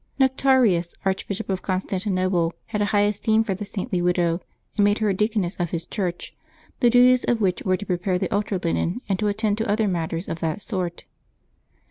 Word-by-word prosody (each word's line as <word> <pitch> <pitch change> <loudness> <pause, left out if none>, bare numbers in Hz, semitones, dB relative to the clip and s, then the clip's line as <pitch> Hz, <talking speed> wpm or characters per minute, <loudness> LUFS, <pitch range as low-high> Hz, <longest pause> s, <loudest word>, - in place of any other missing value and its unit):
Nectarius, 260 -10 +3
Archbishop 195 +2 -2
of 190 -2 -2
Constantinople, 185 -2 0
had 210 -2 -3
a - - +3
high 205 0 +2
esteem 210 +2 +2
for 210 -3 -1
the 200 +3 -5
saintly 195 -2 -3
widow, 175 -1 +1 0.3
and 205 - +3
made 205 +1 +3
her 215 -1 +1
a - - +2
deaconess 210 -2 0
of 175 -2 -1
his 165 0 -4
church, 180 -4 -4 0.4
the 240 - +5
duties 250 +1 +5
of 240 - +1
which 190 -4 +1
were 185 -1 +1
to 205 - -7
prepare 180 0 0
the - - -2
altar 205 -1 0
linen 180 +4 -1
and 195 -2 0
to 210 - +1
attend 210 0 0
to 225 -1 -1
other 215 +1 +2
matters 170 -1 -2
of 165 - -4
that 160 +1 -2
sort. 180 -5 -3
195 Hz, 195 wpm, -24 LUFS, 180-215 Hz, 0.4 s, the